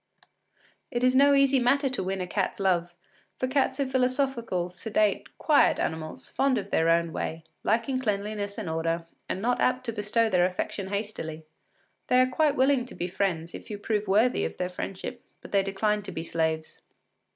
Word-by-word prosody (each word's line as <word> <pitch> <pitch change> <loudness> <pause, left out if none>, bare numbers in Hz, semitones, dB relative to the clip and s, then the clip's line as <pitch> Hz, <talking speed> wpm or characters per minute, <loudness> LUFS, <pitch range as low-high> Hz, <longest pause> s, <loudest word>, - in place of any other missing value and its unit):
It 240 0 -2
is 255 0 +4
no 280 +1 +6
easy 275 -1 +4
matter 270 +3 +3
to 260 -5 -2
win 190 0 -2
a - - -1
cat’s 190 +2 -2
love, 175 -3 +1 0.4
for 255 - -1
cats 265 +1 +1
are 280 - +2
philosophical, 255 -8 0
sedate, 210 +2 -1
quiet 300 -2 +4
animals, 160 -1 -4
fond 270 -2 +2
of - - -5
their 165 +1 +3
own 170 -1 +2
way, 160 0 -4 0.2
liking 235 +4 +1
cleanliness 205 -3 -2
and 215 -5 -4
order, 165 +1 -1 0.2
and 190 - -3
not 245 +1 +1
apt 255 0 +1
to 230 - -1
bestow 220 +2 +1
their 180 -4 +3
affection 185 +1 -4
hastily. 195 -6 -4 0.6
They 250 - +4
are 255 - +6
quite 285 +3 +1
willing 260 -1 +3
to - - -11
be 175 - -2
friends, 175 -3 -2
if - - -9
you 210 - -4
prove 210 0 -1
worthy 220 +6 +3
of - - -3
their 180 0 -2
friendship, 185 +1 -6 0.2
but - - -13
they 200 - +4
decline 205 +2 0
to 200 -1 -8
be 165 -2 -4
slaves. 160 -1 -2
205 Hz, 185 wpm, -27 LUFS, 180-255 Hz, 0.6 s, no